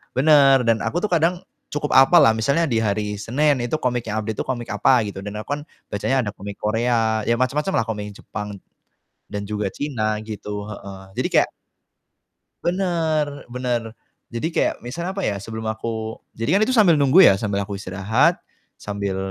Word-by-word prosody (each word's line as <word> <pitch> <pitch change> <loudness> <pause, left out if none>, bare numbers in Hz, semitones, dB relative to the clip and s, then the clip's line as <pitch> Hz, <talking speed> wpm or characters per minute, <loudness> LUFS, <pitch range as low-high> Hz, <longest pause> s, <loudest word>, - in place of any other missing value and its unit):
bener 135 -2 +5
,dan 115 - +4
aku 175 - -1
tuh 210 - -1
kadang 175 +2 +2 0.3
cukup 150 0 -2
hapal 135 +6 +7
lah, 125 - +6
misalnya 140 +9 +1
di 115 -4 +1
hari 105 0 -1
Senin 140 +6 +1
itu 120 +5 -1
komik 125 -4 -1
yang 110 0 -1
update 110 0 -4
itu - - -1
komik 120 -3 -3
apa, 115 +3 +3
gitu 100 -1 -6
dan 105 +1 -6
aku 145 - -2
kan - - -9 0.3
bacanya 130 +6 0
ada 105 - -3
komik 100 +1 -7
Korea, 110 0 +1
ya 120 - +3
macem-macem 145 +8 0
lah 115 - +2
komik 105 -2 -4
yang - - -15
Jepang, 105 +1 -6 0.8
dan 100 0 -4
juga 105 -2 -1
China 110 -7 -2
gitu, 105 -1 -6
heeh. 100 -2 -9 0.2
Jadi - - +1
kayak - - +4 1.2
bener 170 -4 +1 0.2
bener, 125 -1 -1 0.5
jadi 120 +7 -1
kayak - - +2
misalnya, 170 +9 -4
apa - - -1
ya, 100 - -1
sebelum 110 +1 -6
aku 110 0 -4 0.2
jadi 130 +12 +2
kan - - +1
itu 260 - 0
sambil 195 -8 +6
nunggu 145 +7 +7
ya, - - +4
sambil 100 -2 -1
aku 100 - -5
istirahat, 100 +3 +1 0.4
sambil 100 -2 -3
115 Hz, 185 wpm, -22 LUFS, 105-145 Hz, 1.2 s, hapal